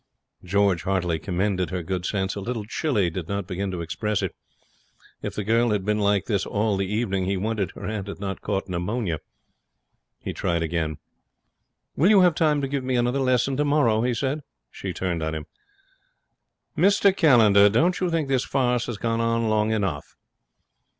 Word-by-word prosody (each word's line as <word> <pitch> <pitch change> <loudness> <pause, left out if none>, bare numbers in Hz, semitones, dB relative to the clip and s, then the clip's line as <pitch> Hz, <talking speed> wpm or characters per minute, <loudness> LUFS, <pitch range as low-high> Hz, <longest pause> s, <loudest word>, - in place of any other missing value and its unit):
George 100 -2 +2
heartily 90 -4 0
commended 95 +1 -1
her 90 -2 -3
good 90 0 -3
sense. 95 -2 -1
A - - -5
little 115 0 -4
chilly 110 - 0
did 85 -1 -5
not 100 -1 -2
begin 95 +2 -3
to 90 -2 -4
express 100 +6 -2
it. - - -2 0.9
If - - -5
the 105 - -2
girl 115 +3 +2
had 105 -3 0
been 105 0 +1
like 100 -2 +2
this 100 -3 0
all 105 0 0
the 95 0 -2
evening, 100 -4 0
he 95 +1 0
wondered 105 -1 -1
her - - -8
aunt 105 -2 -4
had 100 - -7
not 95 -1 -4
caught 100 -2 -2
pneumonia. 90 -1 -2 1.0
He - - -6
tried 85 -2 -1
again. 80 -2 -2 1.0
'Will 170 +7 +4
you 205 -3 +7
have 180 -2 +5
time 150 -2 +2
to 135 - -1
give 135 -1 -2
me 130 0 -1
another 125 +2 +1
lesson 130 0 +1
tomorrow?' 145 -6 +2
he 120 0 0
said. 135 +5 -1 0.3
She - - -5
turned 90 -3 -2
on 80 0 -2
him. 75 -1 -5 1.3
'Mr 195 +3 +4
Callender, 110 - +6
don't 165 - +2
you 185 - 0
think 165 -4 0
this 135 -1 +1
farce 125 -3 0
has 120 - -4
gone 115 +1 -1
on 115 -1 +1
long 110 0 +2
enough?' 95 -10 -2
105 Hz, 185 wpm, -24 LUFS, 95-125 Hz, 1.3 s, you